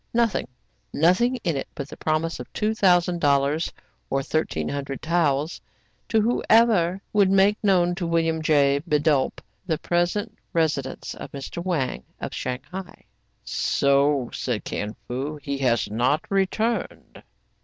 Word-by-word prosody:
Nothing! 230 - +1 0.4
nothing 185 - +3
in 170 -4 0
it 135 - -3
but 140 - -5
the - - -10
promise 155 +1 -1
of - - -9
two 215 0 0
thousand 180 -4 +3
dollars, 140 +2 +2 0.4
or 135 0 0
thirteen 135 - -1
hundred 140 -2 -4
taels, 155 -2 0 0.5
to 225 - +3
whoever 220 -5 +3
would 200 -2 +4
make 195 +2 +3
known 180 -3 +3
to 175 -1 -3
William 165 -1 +1
J. 140 -2 +3
Bidulph 150 -2 +2 0.3
the 160 -3 +1
present 175 +5 -1 0.2
residence 150 -5 -1
of - - -9
Mr. 140 +5 -6
Wang 145 - -1 0.2
of - - -5
Shang 125 0 -3
hai. 190 0 -8 0.4
"So," 140 -2 +1
said 120 -5 -2
Kin 105 +1 -4
Fo, 135 +5 -3
"he 140 -1 -4
has 120 -5 +1
not 125 +8 +1
returned." 205 +4 -1
160 Hz, 140 wpm, -24 LUFS, 140-185 Hz, 0.5 s, would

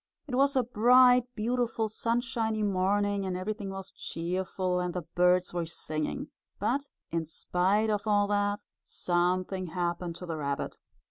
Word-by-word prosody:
It 275 - -8
was 275 +2 +3
a 260 - +4
bright, 245 +2 +6
beautiful 230 0 0
sunshiny 225 -1 -1
morning, 200 +1 +1
and 185 -1 -2
everything 205 +2 -4
was 195 0 -6
cheerful, 180 +1 -2
and 180 0 -2
the 180 - -2
birds 180 +2 +2
were 170 -2 -2
singing. 155 -2 -3 0.3
But, 280 +1 -1 0.2
in 165 0 0
spite 190 +7 +1
of 210 +1 -1
all 205 -1 +4
that, 205 0 0 0.2
something 185 +1 0
happened 175 0 -2
to 180 - -7
the 165 -2 -4
rabbit. 140 -2 -3
195 Hz, 145 wpm, -29 LUFS, 180-220 Hz, 0.3 s, bright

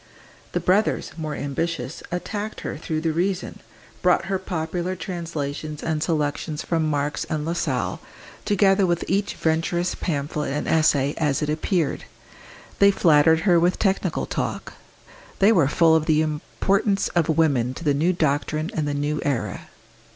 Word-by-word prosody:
The - - +1
brothers, 200 +4 +1
more 155 -2 -4
ambitious, 165 +5 -3
attacked 205 +4 -4
her - - -4
through 155 0 -3
the 160 -1 0
reason, 185 +3 -2 0.4
brought - - +3
her 195 -1 -1
popular 175 0 -3
translations 155 -5 -5
and 155 -1 -1
selections 155 -1 -1
from 160 -2 0
Marx 145 0 -1
and 150 -1 -3
Lassalle, 170 +1 -1 0.4
together 200 -2 +3
with 175 -1 0
each 200 +2 0
Venturist 170 +2 0
pamphlet 150 -2 -2
and 150 - -2
essay 145 -3 +3
as 150 -2 0
it 150 - -1
appeared; 155 0 -1 0.7
they 200 - +7
flattered 160 -4 +4
her 175 -3 +4
with 175 +2 +2
technical 195 -2 0
talk; - - -4 0.6
they 200 +3 +5
were 165 -11 +4
full 160 +2 +4
of 155 -1 +1
the 155 -1 +3
importance 195 +6 0
of 170 -2 0
women 140 -6 +2
to 170 - -8
the 145 -3 +2
new 160 +6 +2
doctrine 155 -1 -1
and 155 -2 -1
the 145 - -1
new 145 +1 -1
era. 115 -9 -2
160 Hz, 150 wpm, -23 LUFS, 150-180 Hz, 0.7 s, they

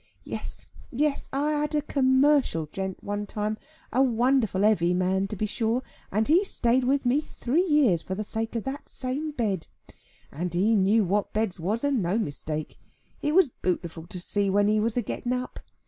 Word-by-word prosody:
Yes, - - -6 0.3
yes; 290 +3 0
I 290 +3 0
had 300 0 -1
a 295 - +1
commercial 265 - +3
gent 190 +4 -5
one 205 0 -3
time, 215 +1 -2 0.3
a 260 - +4
wonderful 240 -5 +2
heavy 180 -5 +3
man 190 +2 +1
to 210 - -5
be 215 - -1
sure, 225 +4 0 0.3
and 215 +3 +1
he 340 +6 +5
stayed 250 -9 +1
with 275 +1 +1
me 260 +5 +3
three 300 +3 0
year 295 - +3
for 190 +3 -5
the 215 - -3
sake 225 +2 -4
of 230 - -1
that 270 +2 -6
same 270 +5 -3
bed. 215 - -2 0.6
And 175 +4 -4
he 210 +6 +3
knew 205 +2 +4
what 200 +2 0
beds 215 -4 -1
was, 205 - -1
and 280 -5 +2
no 180 +4 0
mistake. 155 -5 -4 0.4
It 295 +2 0
was 370 -6 +6
bootiful 170 -5 -3
to 180 - -6
see 200 +3 0
when 205 +1 +3
he 215 0 +3
was 225 +2 0
a 245 - +1
getting 240 +4 -3
up. 250 0 -4
220 Hz, 190 wpm, -26 LUFS, 190-270 Hz, 0.6 s, was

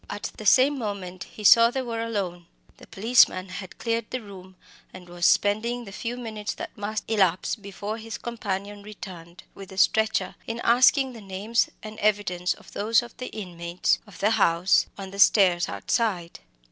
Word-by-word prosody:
At 205 - -5
the 215 - -5
same 270 +6 +5
moment 195 -5 -5
he 215 - -12
saw 230 +3 +8
that 240 - -4
they 265 - 0
were 230 -2 -4
alone. 190 -7 -4 0.3
The - - -15
policeman 195 -3 +3
had 185 0 -8
cleared 230 -2 -2
the 255 - -3
room, 190 -2 -12 0.4
and 185 -1 -12
was 175 -1 0
spending 230 +4 +1
the 195 - -10
few 230 +4 -5
minutes 220 -3 -5
that - - -8
must 215 0 -4
elapse 190 -5 +1
before 205 +1 -6
his 225 0 -7
companion 205 -3 -5
returned 185 -4 -11
with 195 -1 -11
the 190 - -11
stretcher, 220 +2 +2
in 230 +1 -4
taking 255 +2 +4
the 230 - -10
names 200 +4 -1
and 215 0 -9
evidence 200 -4 0
of - - -17
some 215 +3 -4
of 235 - -15
the 255 - -6
inmates 175 -3 -2
of 205 - -14
the 210 +2 +2
house, 185 -4 +3
on 195 -1 -7
the 200 - -9
stairs 185 -4 +5
outside. 190 -8 -2
205 Hz, 180 wpm, -25 LUFS, 185-230 Hz, 0.4 s, saw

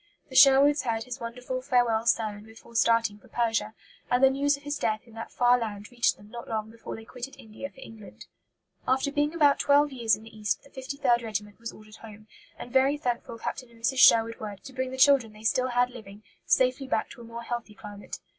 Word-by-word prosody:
The - - -11
Sherwoods 280 +2 +7
heard 225 -2 -2
his 250 +2 -7
wonderful 250 +2 -5
farewell 240 -3 +1
sermon 215 -3 +1
before 225 +1 -16
starting 230 -2 +2
for - - -20
Persia; 225 -2 -1 0.3
and 245 +2 +2
the 265 - +7
news 280 +1 +1
of 285 - -19
his 290 0 -4
death 215 -1 0
in 230 - -18
that 225 0 -8
far 245 0 +3
land 205 -2 -6
reached 240 -1 +1
them 205 - -16
not 235 -1 -8
long 220 -1 -3
before 230 0 -8
they 225 - -11
quitted 250 +3 -8
India 220 +5 -9
for 265 - -20
England. 220 -5 -12 0.6
After 265 +2 +1
being 295 0 +1
about 290 -4 +4
twelve 290 +1 +4
years 235 -4 +2
in 215 - -14
the 225 0 -14
East, 210 -1 -2
the 280 - -19
53rd 265 -2 0
Regiment 210 -2 -5
was 230 0 -6
ordered 215 0 -15
home, 215 -1 -13 0.3
and 245 - -9
very 270 +2 +3
thankful 240 -3 -3
Captain 250 +2 -5
and 230 -1 -20
Mrs. 260 +2 +1
Sherwood 230 -2 +6
were 210 -2 -6
to 265 +7 -13
bring 260 0 -2
the 260 - -7
children 260 -5 +4
they 215 +1 -15
still 255 +3 +2
had 245 0 +1
living 210 -3 -12 0.2
safely 260 +1 +2
back - - -1
to 240 - -12
a - - -10
more 230 0 -8
healthy 235 -3 -5
climate. 205 -1 -9
235 Hz, 220 wpm, -27 LUFS, 220-260 Hz, 0.6 s, Sherwoods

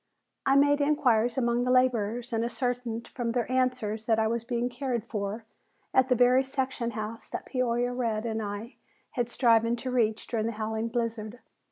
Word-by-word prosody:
I 270 - +5
made 285 +1 +4
inquiries 245 -6 +2
among 240 -1 +1
the 250 - -1
laborers 245 -2 +2
and 225 0 +1
ascertained 240 -1 -2
from 235 -3 -3
their 245 0 -1
answers 250 -4 0
that 225 -2 +3
I 220 - +2
was 230 +1 -1
being 240 0 -1
cared 250 -3 -2
for 215 0 -4 0.5
at 260 0 +4
the 250 - +4
very 250 +2 +5
section 265 -3 -2
house 215 +1 -5
that - - -5
Peoria 245 -1 0
Red 230 -3 -1
and 225 -1 -2
I 210 +4 -6 0.3
had 240 -1 -1
striven 230 -1 +3
to 255 +2 -5
reach 225 -3 +1
during 225 -2 -1
the 230 - -2
howling 220 +1 -2
blizzard. 230 -1 -3
235 Hz, 180 wpm, -28 LUFS, 225-250 Hz, 0.5 s, I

